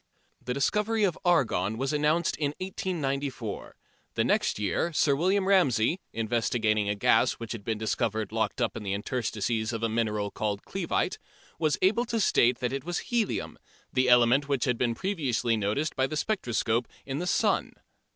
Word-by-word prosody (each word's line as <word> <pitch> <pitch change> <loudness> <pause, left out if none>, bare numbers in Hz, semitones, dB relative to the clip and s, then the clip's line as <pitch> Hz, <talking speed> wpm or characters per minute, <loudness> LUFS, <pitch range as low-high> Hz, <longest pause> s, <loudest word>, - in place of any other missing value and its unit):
The 125 - -3
discovery 210 +10 +1
of 185 -5 +2
argon 110 - +2
was 135 +4 -1
announced 150 +3 +1
in 145 -1 -1
1894. 140 - -3 0.4
The - - +2
next - - +1
year 105 - 0
Sir 145 -2 +3
William 190 +5 +1
Ramsey, 170 - +3
investigating 110 -2 0
a 105 - 0
gas 100 - +3
which 115 -1 -8
had 115 -4 -5
been 110 +1 -2
discovered 110 -1 -1
locked - - -1
up - - -1
in - - -5
the 100 -2 -2
interstices 110 0 -2
of 115 -1 -4
a 115 - +1
mineral 105 -2 -1
called 105 -1 -3
clevite, - - -2 0.4
was 155 -2 +1
able 220 +6 +3
to 230 -1 -1
state 120 - +3
that 125 +1 -1
it 135 - -3
was 175 +2 -3 0.2
helium, 230 -4 -1 0.3
the 130 -1 +2
element 125 +4 +5
which 140 -3 +1
had 125 -3 0
been 120 -2 +1
previously 130 - 0
noticed 110 +9 -1
by 130 -1 +1
the 155 - -4
spectroscope 120 - 0 0.2
in 135 +1 -3
the 180 - -3
sun. - - +1
125 Hz, 170 wpm, -28 LUFS, 110-160 Hz, 0.4 s, element